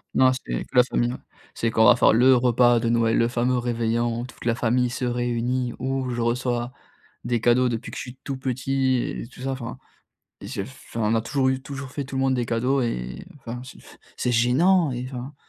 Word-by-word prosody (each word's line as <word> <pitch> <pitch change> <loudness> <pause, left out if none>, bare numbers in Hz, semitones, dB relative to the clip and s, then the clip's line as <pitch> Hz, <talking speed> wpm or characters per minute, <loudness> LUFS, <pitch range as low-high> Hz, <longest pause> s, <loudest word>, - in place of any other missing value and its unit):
Non, 130 0 +5
c'est - - -4
que - - -18
la 125 - +8
famille 120 -1 0 0.4
c'est 115 - 0
qu'on 110 0 +4
va - - +8
faire 125 - +4
le 130 +3 +6
repas 120 -1 +4
de 115 0 -1
Noël, 115 -1 +2
le 115 - +3
fameux 125 +1 0
réveillon, 120 0 -1
toute 130 - -13
la 115 -1 +2
famille 125 +1 +1
se 125 +1 -3
réunit 120 0 -1
où 130 0 -2
je 120 -1 -2
reçois 120 +1 -1 0.5
des 120 -1 -1
cadeaux 120 +1 +3
depuis 115 0 -4
que - - -7
je - - -3
suis 125 +1 -9
tout 135 -2 -4
petit 130 0 0
et 120 - -3
tout 125 - -14
ça, 135 +1 -2
enfin. 125 -1 -6 0.6
Et - - -8
je - - -4
enfin, 130 -2 -8
on - - +3
a 110 - +2
toujours 130 +3 +1
eu 130 0 -1
toujours 135 -1 -7
fait 140 - -4
tout 135 0 -8
le - - 0
monde 135 0 +2
des 120 -1 -1
cadeaux 125 +4 +1
et 60 - -4
enfin, 120 0 -7
c'est 130 - -12 0.4
c'est 125 - 0
gênant 150 +7 +3
et 125 +1 -4
enfin. 130 +2 -7
125 Hz, 220 wpm, -24 LUFS, 120-130 Hz, 0.6 s, la